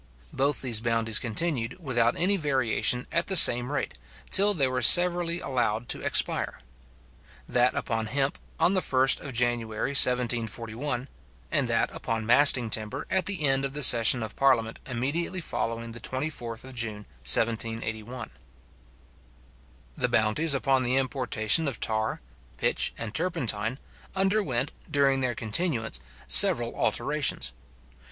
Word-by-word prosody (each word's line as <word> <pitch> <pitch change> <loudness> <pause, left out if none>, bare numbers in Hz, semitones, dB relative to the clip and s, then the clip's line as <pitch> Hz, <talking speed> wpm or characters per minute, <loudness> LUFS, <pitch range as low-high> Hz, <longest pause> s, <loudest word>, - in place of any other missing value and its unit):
Both 140 +1 -1
these 115 -4 0
bounties 115 -2 0
continued, 130 +3 -4
without 120 -7 -1
any 190 +4 0
variation, 130 - -1
at 170 - -1
the 190 - 0
same 125 -6 +8
rate, 145 - -5 0.3
till 205 +1 +4
they 140 -5 +1
were 130 0 -3
severally 175 +4 +5
allowed 120 -3 -3
to - - -1
expire; - - 0 0.9
that 125 +1 0
upon 110 -2 -3
hemp 135 +4 -2 0.2
on 185 - +2
the 185 - +1
1st 130 -3 +2
of 140 - -9
January 120 0 -2
1741, 125 0 0 0.4
and - - 0
that - - -1
upon 115 -1 -5
masting 125 -1 +4
timber 110 +6 -2
at 190 -2 0
the 190 -7 0
end 135 0 0
of 135 0 -4
the 150 0 -1
session 120 -1 +7
of 110 - -7
parliament 120 -5 0
immediately 140 +9 -3
following 115 -7 -5
the 120 - -9
24th 130 -3 -6
June 110 -4 -3 0.2
1781. 115 - -1 1.6
The - - -2
bounties 115 +8 +1
upon 135 -1 0
the 125 0 -1
importation 130 +1 0
of 135 -6 -3
tar, 110 - -3 0.4
pitch, - - -1
and 115 -2 -7
turpentine, 120 - -3 0.4
underwent, 190 - -1 0.2
during 140 -3 0
their 125 -2 -2
continuance, 110 - -3 0.3
several - - +6
alterations. 65 0 -1
125 Hz, 130 wpm, -25 LUFS, 115-145 Hz, 1.6 s, same